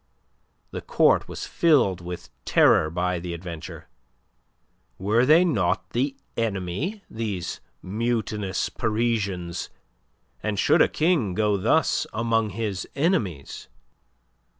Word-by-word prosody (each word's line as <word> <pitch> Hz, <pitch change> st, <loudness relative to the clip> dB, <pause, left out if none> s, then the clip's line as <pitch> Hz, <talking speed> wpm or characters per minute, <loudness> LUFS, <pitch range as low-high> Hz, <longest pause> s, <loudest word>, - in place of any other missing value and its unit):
The -, -, -5 dB
Court -, -, +3 dB
was -, -, -6 dB
filled 125 Hz, -, +3 dB
with 90 Hz, 0 st, -7 dB
terror 80 Hz, -, +4 dB
by 90 Hz, +2 st, -1 dB
the 85 Hz, 0 st, -5 dB
adventure. 85 Hz, -2 st, -8 dB, 1.1 s
Were 110 Hz, +6 st, +2 dB
they 165 Hz, +4 st, +6 dB
not 170 Hz, -, 0 dB
the 135 Hz, +3 st, 0 dB, 0.2 s
"enemy," 115 Hz, -, -2 dB
these 100 Hz, -6 st, -4 dB, 0.2 s
mutinous 105 Hz, -2 st, -1 dB
Parisians? 100 Hz, -6 st, -1 dB, 0.7 s
And 105 Hz, -1 st, -2 dB
should -, -, +4 dB
a -, -, +6 dB
King 155 Hz, -, +1 dB
go 105 Hz, -1 st, +2 dB
thus 115 Hz, +11 st, +2 dB
among 115 Hz, -1 st, +1 dB
his 105 Hz, -2 st, -3 dB
enemies? 135 Hz, -, -1 dB
105 Hz, 105 wpm, -25 LUFS, 90-120 Hz, 1.1 s, they